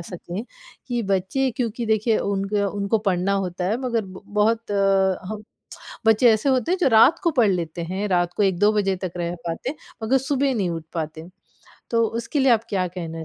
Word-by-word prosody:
सकें, 175 +3 -6 0.4
कि 240 -2 -1
बच्चे 195 +7 0
क्योंकि 235 -1 -2
देखिए 220 +1 +2
उनके 200 +1 -1
उनको 200 +2 0
पढ़ना 185 +1 +1
होता 180 0 -4
है 205 +5 +1
मगर 235 -4 -1
ब 190 0 -11
बहुत 215 +2 0 0.6
हम 215 -1 -5 0.6
बच्चे 225 +2 +5
ऐसे 220 +6 0
होते 260 +6 +1
हैं 370 - +2
जो 330 - +4
रात 225 +7 +6
को 335 - +3
पढ़ 240 -8 +3
लेते 170 -2 -3
हैं, 190 +5 -3
रात 175 -2 +1
को 210 - +1
1-2 195 +2 +3
बजे 195 -2 +1
तक 180 - -4
रह 175 0 -2
पाते, 245 - -4 0.3
मगर 250 +5 +3
सुबह 270 +1 0
नहीं 200 -7 0
उठ 165 -1 -4
पाते। 160 0 -5 0.6
तो 230 -1 +3
उसके 230 +6 -3
लिए 265 -2 +5
आप 225 -1 +2
क्या 185 -2 0
कहना 165 -2 -6
205 Hz, 190 wpm, -23 LUFS, 180-230 Hz, 0.6 s, रात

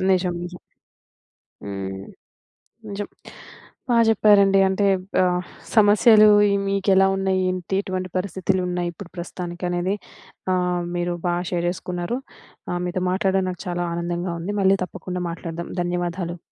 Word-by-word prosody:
నిజం. 180 -1 +2
నిజం. 175 0 -7 1.1
హ్మ్. 95 -1 -5 0.9
నిజం. 200 +1 -4 0.8
బా 240 - +3
జెప్పారండి. 200 -2 +5
అంటే 190 +2 0 0.4
ఆహ్, 180 0 +1 0.3
సమస్యలు 215 +1 +7 0.2
ఇయి 200 - +2
మీకు 195 0 -1
ఎలా 195 0 +5
ఉన్నయి? 190 -1 +1
ఏంటి, 185 +1 -3
ఎటువంటి 185 -1 -3
పరిస్థితులున్నయి, 180 -2 -1
ఇప్పుడు 175 +2 -11
ప్రస్తుతానికనేది 175 +1 -3 0.6
ఆహ్, 180 -1 0
మీరు 175 0 -1
బా 175 - +2 0.2
షేర్ 175 -1 -1
జేసుకున్నారు. 180 +5 -3 0.5
ఆహ్, 175 - -1
మీతో 180 +1 -2
మాట్లాడ్డం 190 0 +1
నాకు 180 - -7
చాలా 175 0 -1
ఆనందంగా 175 +1 -2
ఉంది. 205 +5 -3
మళ్ళీ 190 +1 +5
తప్పకుండా 180 0 -6
మాట్లాడదాం. 170 0 -6
ధన్యవాదాలు. 175 0 -2
180 Hz, 125 wpm, -23 LUFS, 175-195 Hz, 1.1 s, సమస్యలు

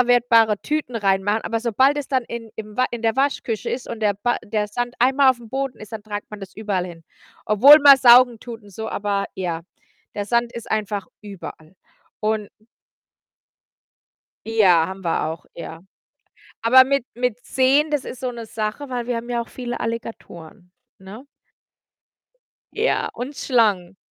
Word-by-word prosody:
wiederverwertbare 235 -3 +4
Tüten 300 -5 -2
reinmachen. 205 +1 +1
Aber 225 0 -2
sobald 260 +5 +2
es 285 - -5
dann 260 -3 0
in 230 -1 -8
im 215 -1 -8
wa 255 - +2
in 240 -1 -6
der 225 +1 +1
Waschküche 265 -5 -1
ist 250 - -4
und 230 -1 -6
der 210 -2 +1
ba 240 +4 -1
der 210 0 -1
Sand 245 +3 -3
einmal 265 +2 +5
auf'm 240 -3 -6
Boden 270 -1 -3
ist, 215 0 -12
dann 220 - -6
tragt 205 -1 -7
man 210 -1 -9
das 195 -1 -10
überall 200 -4 -2
hin. 165 -2 -12 0.4
Obwohl 245 +8 +8
man 280 -1 +10
saugen 245 -2 +6
tut 235 -2 -9
und 205 - -16
so, 220 +3 -6
aber 200 -2 -2
ja. 170 -3 -4 0.5
Der 205 - -3
Sand 235 +2 0
ist 235 - -8
einfach 210 -2 -2 0.2
überall 190 -4 -10 0.4
und 215 -1 -1 2.0
Ja, 190 -8 +4
haben 190 0 -8
wir 165 -2 0
auch, 160 +2 -6
ja. 165 -1 -9 0.8
Aber 255 +3 +7
mit 275 -1 0
mit 245 -1 -1
Seen, 275 +4 +2
das 295 -3 -1
ist 250 - -8
so 255 - -2
'ne 235 -1 -8
Sache, 220 +5 -5
weil 245 -2 -3
wir 245 -1 -1
haben 235 +1 -6
ja 240 -1 0
auch 235 - -7
viele 245 -1 -6
Alligatoren, 200 -6 -7 0.3
ne? 195 +7 -11 1.5
Ja, 450 +3 0
und 270 +4 -6
Schlangen. 205 -7 +1
225 Hz, 170 wpm, -21 LUFS, 205-250 Hz, 2.0 s, man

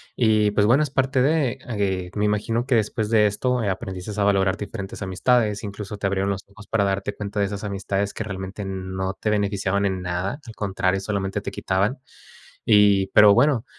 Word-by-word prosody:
Y, 110 -3 +3
pues, 105 0 +2
bueno, 125 +7 +4
es 150 - -2
parte 135 0 +1
de, 135 -2 +1
eh, 95 -5 -1
me 105 0 +1
imagino 110 +3 0
que 130 -2 +2
después 110 -1 0
de 105 -2 +5
esto 125 +5 0
aprendistes 95 -1 -4
a 105 - +1
valorar 100 -1 +2
diferentes 100 -2 -7
amistades, 105 +3 +1
incluso 105 0 -6
te 100 - -1
abrieron 100 0 0
los 95 -1 -4
ojos 100 +1 -15
para 110 -2 +1
darte 100 +1 -1
cuenta 105 0 -4
de 100 - +3
esas 100 0 -5
amistades 100 0 -2
que - - -3
realmente 95 0 -6
n 95 -1 -5
no 95 0 -1
te 105 - -3
beneficiaban 100 -1 0
en 95 -2 -1
nada, 90 +8 -3
al 115 -2 -10
contrario, 95 -1 0
solamente 95 -1 -2
te - - -5
quitaban. 100 +8 -1 0.7
Y, 105 -3 +5
pero 105 +1 +7
bueno, 125 0 +3
100 Hz, 195 wpm, -23 LUFS, 95-110 Hz, 0.7 s, pero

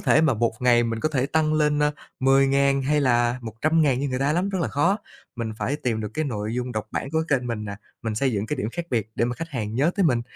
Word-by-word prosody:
thể - - +4
mà 150 -6 +3
một 115 +1 +1
ngày 120 -1 +4
mình 115 -1 -2
có 155 - +1
thể 135 -3 0
tăng 155 0 +1
lên, 150 -1 +2
a, 150 - +3 0.3
10.000 135 +1 +3
hay 150 +2 +2
là 120 -2 +2
100.000 135 +4 +1
như 140 - -1
người 130 0 -2
ta 140 +2 +1
lắm, 180 +4 0
rất 190 -2 -2
là - - -1
khó. 145 +8 +2 0.4
Mình 115 -2 -3
phải 145 +4 -1
tìm 115 -6 -2
được 105 - -3
cái 155 - 0
nội 110 -3 -3
dung 125 0 -3
độc 110 0 -3
bản 135 - -3
của 160 0 +1
kênh 125 -3 +1
mình 110 -3 -3
nè, 100 -1 -5 0.3
mình 110 -2 -2
xây 130 +3 +1
dựng 105 +1 -1
cái 150 - -2
điểm 110 -4 -2
khác 175 - -4
biệt 110 -3 -1
để 115 - +1
mà 125 +1 -2
khách 165 +3 -6
hàng 110 -6 -4
nhớ 145 +7 +3
tới 195 - +3
mình. 120 -6 +2
130 Hz, 280 wpm, -24 LUFS, 115-150 Hz, 0.4 s, thể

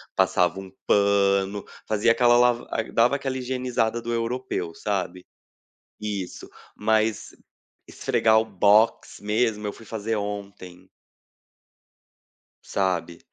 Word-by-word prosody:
passava 90 +1 +2
um 95 -1 -10
pano, 100 0 +2 0.2
fazia 110 +2 +3
aquela 120 0 +4
lava 120 0 +2
ah, 115 - 0
dava 120 +4 +3
aquela 135 -2 -3
higienizada 125 -3 -1
do 120 0 -3
europeu, 115 -7 -3
sabe. 90 -3 -3 0.8
Isso. 100 -4 -5 0.3
Mas 110 0 0 0.6
esfregar 110 0 +2
o 110 - -1
box 105 +2 +2
mesmo, 105 0 0
eu 100 - -4
fui 115 - -14
fazer 110 +1 -3
ontem. 100 -3 -7 1.7
Sabe. 90 -3 -2
105 Hz, 110 wpm, -24 LUFS, 100-115 Hz, 1.7 s, aquela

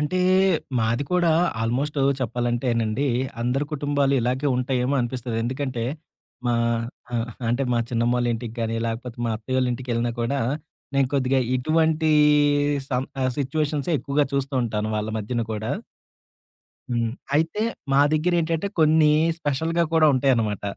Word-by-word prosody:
అంటే, 150 +5 0 0.6
మాది 115 +4 0
కూడా 175 -2 +3 0.3
ఆల్‌మొ‌స్టు 135 +5 0 0.2
చెప్పాలంటేనండి, 120 0 0 0.3
అందరి 125 +4 0
కుటుంబాలు 145 -1 +1
ఇలాగే 130 +4 0
ఉంటాయేమో 125 +1 0
అనిపిస్తది. 120 -1 -3
ఎందుకంటే, 130 -2 -2 0.6
మా 120 - +2 0.6
ఆహ్, 115 0 -1 0.2
అంటే, 120 +4 +1
మా 120 - +2
చిన్నమ్మోళ్ళ 120 +1 +1
ఇంటికి 115 0 -6
గాని, 115 0 -1
లేకపోతే 115 +1 -5
మా 115 - 0
అత్తయ్యోళ్ళ 130 +3 0
ఇంటకెళ్ళినా 120 -1 -2
కూడా 135 +4 0 0.5
నేను 140 -1 +3
కొద్దిగా 135 -1 +2 0.2
ఇటువంటీ 160 +3 +2 0.8
సం 125 0 0 0.2
ఆహ్, 130 - +2
సిట్యుయేషన్సే 145 +2 -1
ఎక్కువగా 140 +2 0
చూస్తూ 140 0 -1
ఉంటాను 110 -1 -2
వాళ్ళ 105 0 -2
మధ్యన 115 +3 -2
గూడా. 110 +1 -3 1.2
హ్మ్. 115 -2 0 0.2
అయితే 165 +7 +1 0.3
మా 135 - +5
దగ్గరెంటంటే, 165 +2 +1
కొన్ని 155 -1 +5 0.3
స్పెషల్‌గా 165 +4 0
కూడా 160 -1 +5
ఉంటాయన్నమాట. 120 -6 +1
130 Hz, 125 wpm, -24 LUFS, 120-145 Hz, 1.2 s, మా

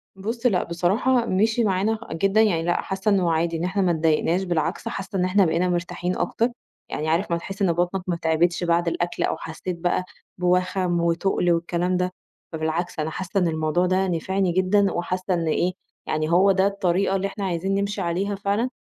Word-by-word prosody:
بُص 225 +5 -5
لأ، 195 -7 +3
بصراحة 215 +9 +1
مشي 220 +4 +2
معانا 210 +2 +1
جدًا، 195 +6 +2
يعني 180 -7 +2
لأ، 175 +1 +1
حاسّة 190 +2 -1
إنّه 185 -4 +2
عادي 165 +1 0
إن 165 - -3
إحنا 190 +3 0
ما 185 -2 +3
اتضايقناش، 165 +2 +1
بالعكس 170 -1 -1
حاسّة 195 +1 -4
إن 180 - +2
إحنا 190 +1 +3
بقينا 180 +2 +1
مرتاحين 175 +1 -2
أكتر، 225 +7 0 0.4
يعني 155 +1 -2
عارف 170 +3 0
ما 170 - +2
تحِس 195 +4 -8
إن 175 -4 +3
بطنك 175 +2 0
ما 175 - 0
تعبتش 170 +1 +1
بعد 170 0 +1
الأكل 175 +1 -1
أو - - 0
حسّيت 170 +2 -6
بقى 175 +1 0 0.3
بوَخَم 180 0 +1
وتُقل 170 +1 +1
والكلام 175 +2 0
ده، 180 0 0 0.4
فبالعكس 160 +1 -2
أنا 155 +1 -1
حَاسّة 190 +4 -2
إن 180 - +2
الموضوع 160 +2 +1
ده 190 +1 +1
نفعني 185 +2 0
جدًا 190 +3 +2
وحاسّة 185 +2 -2
إن 165 -2 -1
إيه، 175 +3 +1 0.3
يعني 155 0 -1
هو 190 +3 +5
ده 190 0 +3
الطريقة 195 -1 0
اللي 195 +1 0
إحنا 195 0 -5
عايزين 185 +2 -1
نمشي 200 0 -1
عليها 190 +4 -1
فعلًا، 205 +5 -1
180 Hz, 190 wpm, -24 LUFS, 170-195 Hz, 0.4 s, هو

